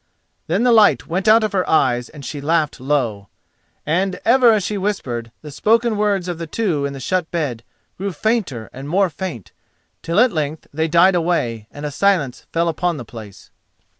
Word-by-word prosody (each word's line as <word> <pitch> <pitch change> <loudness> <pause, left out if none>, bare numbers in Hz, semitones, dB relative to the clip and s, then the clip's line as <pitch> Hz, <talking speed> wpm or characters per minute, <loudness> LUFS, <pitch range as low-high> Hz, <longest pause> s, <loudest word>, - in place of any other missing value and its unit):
Then 185 +8 +1
the 250 - +4
light 220 -3 +5
went 185 +5 -2
out 220 +1 +6
of 215 - 0
her 185 -2 -1
eyes 120 -6 +2
and 145 -3 -11
she 145 - -5
laughed 155 0 0
low. 125 -8 -1 0.6
And 180 +4 0
ever 245 0 +6
as 215 -3 +2
she 210 - -2
whispered, 130 - -3
the 150 - -8
spoken 225 - +2
words 205 -3 0
of 175 -2 -4
the 165 - -5
two 160 -7 -1
in 140 - -6
the 135 - -7
shut 180 +5 -1
bed 145 -9 -2 0.4
grew 200 +1 -2
fainter 170 - -1
and 135 +2 -8
more 190 +1 +2
faint, 155 - -6 0.5
till 170 +4 0
at 250 +1 +5
length 155 -2 -3
they 160 +2 0
died 170 +4 +5
away, 160 -11 -1
and 145 +1 -8
a 150 - -3
silence 165 -6 0
fell 170 +1 +1
upon 170 +1 -1
the 125 - -7
place. 110 -3 -12
165 Hz, 195 wpm, -20 LUFS, 140-195 Hz, 0.6 s, out